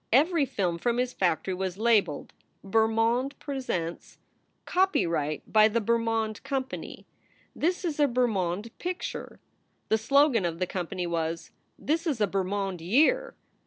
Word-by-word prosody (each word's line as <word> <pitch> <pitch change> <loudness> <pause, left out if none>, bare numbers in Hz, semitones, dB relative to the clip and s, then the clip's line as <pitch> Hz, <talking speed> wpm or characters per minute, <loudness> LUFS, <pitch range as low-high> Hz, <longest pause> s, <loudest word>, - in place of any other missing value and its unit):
Every 295 +4 +4
film 180 -7 -1
from 240 +5 0
his 250 0 0
factory 185 0 0
was 185 0 -3
labeled: 215 -9 +1 0.3
"Bermond 225 +5 +1
presents 220 - -4 0.2
"; - - -43
" - - -46
Copyright 170 - +1
by 215 0 +7
the 225 +2 0
Bermond 225 -1 0
Company"; 265 -1 -5 0.5
"This 360 +4 0
is 310 -3 -2
a 290 - +5
Ber 250 -1 +2
mond 200 0 -2
picture"; 360 0 -5 0.5
The 220 - +3
slogan 275 -1 +4
of 170 -1 -2
the 185 - 0
company 180 0 -4
was, 165 -1 -3 0.3
"This 325 +3 -1
is 280 -8 0
a 210 - +4
Bermond 195 -2 -2
year." 310 - +2
220 Hz, 145 wpm, -27 LUFS, 185-270 Hz, 0.5 s, by